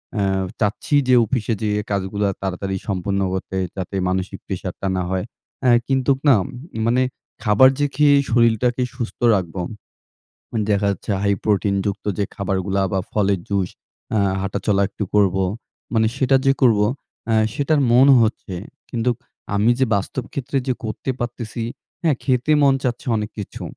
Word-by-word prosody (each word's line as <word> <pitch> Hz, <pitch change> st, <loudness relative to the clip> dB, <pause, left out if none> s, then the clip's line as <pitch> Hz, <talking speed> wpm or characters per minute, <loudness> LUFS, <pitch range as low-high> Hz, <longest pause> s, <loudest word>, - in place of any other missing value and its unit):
অ্যা 100 Hz, -2 st, +1 dB, 0.4 s
চাচ্ছি 105 Hz, +7 st, 0 dB
যে 130 Hz, -, +6 dB
অফিসে 115 Hz, 0 st, -1 dB
যেয়ে 105 Hz, -1 st, 0 dB
কাজগুলো 100 Hz, +1 st, -1 dB, 0.2 s
তাড়াতাড়ি 95 Hz, 0 st, -2 dB
সম্পন্ন 100 Hz, +1 st, -1 dB
করতে 95 Hz, 0 st, -3 dB, 0.2 s
যাতে 95 Hz, +1 st, -4 dB
মানসিক 95 Hz, 0 st, -2 dB
প্রেশারটা 95 Hz, 0 st, -4 dB
না 90 Hz, -, 0 dB
হয়। 95 Hz, +1 st, -1 dB, 0.4 s
অ্যা 125 Hz, -, +5 dB, 0.2 s
কিন্তু 135 Hz, 0 st, +2 dB
না 130 Hz, -, +7 dB, 0.5 s
মানে 125 Hz, +2 st, +3 dB, 0.4 s
খাবার 105 Hz, +4 st, +6 dB
যে 145 Hz, -, +3 dB
খেয়ে 145 Hz, 0 st, +5 dB
শরীরটাকে 120 Hz, +1 st, +3 dB
সুস্থ 120 Hz, -3 st, -5 dB, 0.2 s
রাখবো। 90 Hz, -1 st, -3 dB, 0.9 s
উম 110 Hz, -, 0 dB
দেখা 100 Hz, 0 st, +2 dB
যাচ্ছে, 100 Hz, -, -4 dB
হাই 100 Hz, 0 st, +2 dB
প্রোটিন 100 Hz, -1 st, +1 dB
যুক্ত 100 Hz, 0 st, -3 dB
যে 100 Hz, -, +1 dB
খাবারগুলা 95 Hz, 0 st, -1 dB
বা 95 Hz, -, +2 dB
ফলের 100 Hz, -2 st, +1 dB
জুস 95 Hz, -2 st, 0 dB, 0.5 s
আ -, -, +3 dB, 0.2 s
হাঁটাচলা 100 Hz, +1 st, 0 dB
একটু 105 Hz, -, -4 dB
করব। 100 Hz, -3 st, +4 dB, 0.6 s
মানে 110 Hz, -1 st, +3 dB
সেটা 135 Hz, 0 st, +3 dB
যে 135 Hz, -, +6 dB
করব 115 Hz, -5 st, +5 dB, 0.5 s
আ -, -, +3 dB, 0.2 s
সেটার 145 Hz, +1 st, +1 dB
মন 130 Hz, +3 st, +6 dB
হচ্ছে। 110 Hz, -4 st, -1 dB, 0.4 s
কিন্তু 120 Hz, +1 st, 0 dB, 0.4 s
আমি 105 Hz, +4 st, +4 dB
যে 130 Hz, -, +4 dB
বাস্তব 100 Hz, +5 st, -2 dB
ক্ষেত্রে 135 Hz, 0 st, -2 dB
যে 130 Hz, -, +2 dB
করতে 110 Hz, +4 st, -4 dB
পারতেছি 120 Hz, -1 st, -4 dB, 0.4 s
হ্যাঁ, 160 Hz, -5 st, +2 dB
খেতে 130 Hz, +2 st, +1 dB
মন 140 Hz, -1 st, +5 dB
চাচ্ছে 125 Hz, -1 st, -2 dB
অনেক 105 Hz, -1 st, -2 dB
কিছু। 100 Hz, -, -6 dB
105 Hz, 155 wpm, -21 LUFS, 100-125 Hz, 0.9 s, না